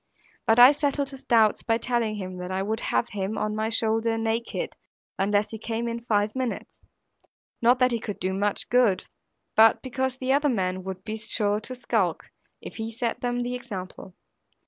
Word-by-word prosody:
But 225 Hz, +2 st, +5 dB
I 250 Hz, +3 st, +10 dB
settled 285 Hz, -1 st, -1 dB
his 270 Hz, -1 st, -11 dB
doubts 220 Hz, -3 st, +3 dB
by 225 Hz, -1 st, +1 dB
telling 235 Hz, -2 st, 0 dB
him, 185 Hz, -2 st, -6 dB
that 180 Hz, 0 st, -6 dB
I 190 Hz, +1 st, -1 dB
would 220 Hz, +2 st, -2 dB
have 240 Hz, -, 0 dB
him 205 Hz, +1 st, -3 dB
on 215 Hz, 0 st, -1 dB
my 220 Hz, +1 st, -1 dB
shoulder 225 Hz, 0 st, +1 dB
naked, 230 Hz, -, -2 dB, 0.5 s
unless 205 Hz, +1 st, +1 dB
he 220 Hz, -, -6 dB
came 230 Hz, +1 st, -3 dB
in 235 Hz, 0 st, -5 dB
five 210 Hz, -1 st, +1 dB
minutes; 255 Hz, -3 st, -4 dB, 0.8 s
not 240 Hz, +2 st, +5 dB
that 255 Hz, 0 st, +3 dB
he 235 Hz, -, 0 dB
could 210 Hz, -2 st, -6 dB
do 185 Hz, +1 st, -1 dB
much 205 Hz, +1 st, 0 dB
good, 235 Hz, -5 st, +3 dB, 0.5 s
but 220 Hz, 0 st, +6 dB
because 260 Hz, 0 st, -2 dB
the 260 Hz, 0 st, 0 dB
other 290 Hz, +1 st, +3 dB
men 185 Hz, -5 st, -1 dB
would 190 Hz, -1 st, -6 dB
be 220 Hz, 0 st, -4 dB
sure 210 Hz, -2 st, 0 dB
to 255 Hz, +4 st, -7 dB
skulk, 220 Hz, -8 st, -1 dB, 0.3 s
if -, -, -9 dB
he 225 Hz, 0 st, -3 dB
set 230 Hz, 0 st, -2 dB
them 245 Hz, 0 st, -1 dB
the 245 Hz, +1 st, -2 dB
example. 195 Hz, -7 st, -7 dB
225 Hz, 190 wpm, -26 LUFS, 205-245 Hz, 0.8 s, I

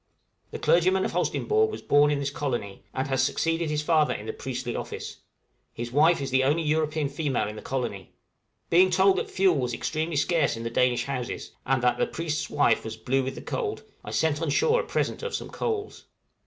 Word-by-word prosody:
The -, -, -6 dB
clergyman 185 Hz, +2 st, +3 dB
of -, -, -2 dB
Holsteinborg 435 Hz, 0 st, +1 dB
was -, -, -7 dB
born 145 Hz, +1 st, +4 dB
in 145 Hz, -, +1 dB
this 140 Hz, 0 st, -2 dB
colony, 120 Hz, -9 st, -3 dB
and 130 Hz, 0 st, -2 dB
has 135 Hz, -1 st, +1 dB
succeeded 165 Hz, +4 st, 0 dB
his 150 Hz, 0 st, -1 dB
father 155 Hz, -1 st, +3 dB
in 105 Hz, -, -7 dB
the 110 Hz, -, -4 dB
priestly 125 Hz, -2 st, -4 dB
office; -, -, -6 dB, 0.6 s
his 120 Hz, +1 st, -5 dB
wife 155 Hz, +4 st, +4 dB
is 135 Hz, -1 st, -3 dB
the 130 Hz, 0 st, +3 dB
only 150 Hz, +5 st, +2 dB
European 155 Hz, -1 st, 0 dB
female 140 Hz, -5 st, -1 dB
in 105 Hz, -, -6 dB
the 105 Hz, -, -8 dB
colony. 120 Hz, -8 st, -4 dB, 0.6 s
Being 180 Hz, +2 st, +6 dB
told 190 Hz, +1 st, +4 dB
that -, -, -4 dB
fuel 185 Hz, -5 st, +3 dB
was 125 Hz, -2 st, -1 dB
extremely 160 Hz, +1 st, -2 dB
scarce 150 Hz, -3 st, +1 dB
in 115 Hz, -, -6 dB
the 115 Hz, -, -3 dB
Danish 125 Hz, 0 st, +2 dB
houses, 125 Hz, -3 st, -4 dB, 0.2 s
and 130 Hz, -2 st, +1 dB
that 125 Hz, 0 st, +2 dB
"the -, -, +2 dB
priest's 160 Hz, -2 st, -3 dB
wife -, -, +2 dB
was -, -, -6 dB
blue 135 Hz, +2 st, 0 dB
with 130 Hz, +1 st, -4 dB
the -, -, -8 dB
cold," 430 Hz, -4 st, -3 dB, 0.2 s
I -, -, -7 dB
sent 160 Hz, -1 st, 0 dB
on 165 Hz, -, -1 dB
shore 460 Hz, -, +3 dB
a -, -, -8 dB
present -, -, -1 dB
of 475 Hz, 0 st, -3 dB
some -, -, -5 dB
coals. 425 Hz, -3 st, -3 dB
145 Hz, 210 wpm, -26 LUFS, 130-170 Hz, 0.6 s, Being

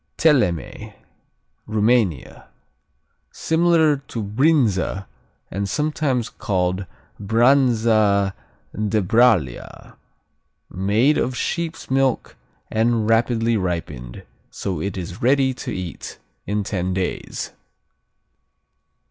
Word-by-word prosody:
Teleme 120 Hz, -, +1 dB, 0.8 s
Rumania 110 Hz, -, 0 dB, 0.8 s
Similar 160 Hz, -2 st, +2 dB
to 115 Hz, -, -4 dB
Brinza 105 Hz, -, +1 dB, 0.5 s
and 100 Hz, +1 st, -3 dB
sometimes 150 Hz, -3 st, -1 dB
called 95 Hz, -1 st, -2 dB, 0.3 s
Branza 110 Hz, -3 st, +3 dB, 0.4 s
de 105 Hz, 0 st, 0 dB
Bralia. 105 Hz, -, +1 dB, 0.8 s
Made 105 Hz, +10 st, +2 dB
of 125 Hz, 0 st, -1 dB
sheep's 165 Hz, -5 st, -3 dB
milk 135 Hz, -2 st, 0 dB, 0.4 s
and 110 Hz, 0 st, +1 dB
rapidly 115 Hz, 0 st, +2 dB
ripened, 85 Hz, -, -4 dB, 0.3 s
so 90 Hz, -6 st, -4 dB
it 100 Hz, +2 st, -3 dB
is 90 Hz, +2 st, -7 dB
ready 130 Hz, +1 st, +3 dB
to 125 Hz, 0 st, -6 dB
eat 90 Hz, -5 st, -6 dB, 0.3 s
in 105 Hz, 0 st, -1 dB
ten 95 Hz, -2 st, -2 dB
days. 95 Hz, -1 st, -4 dB
110 Hz, 85 wpm, -21 LUFS, 95-130 Hz, 0.8 s, Branza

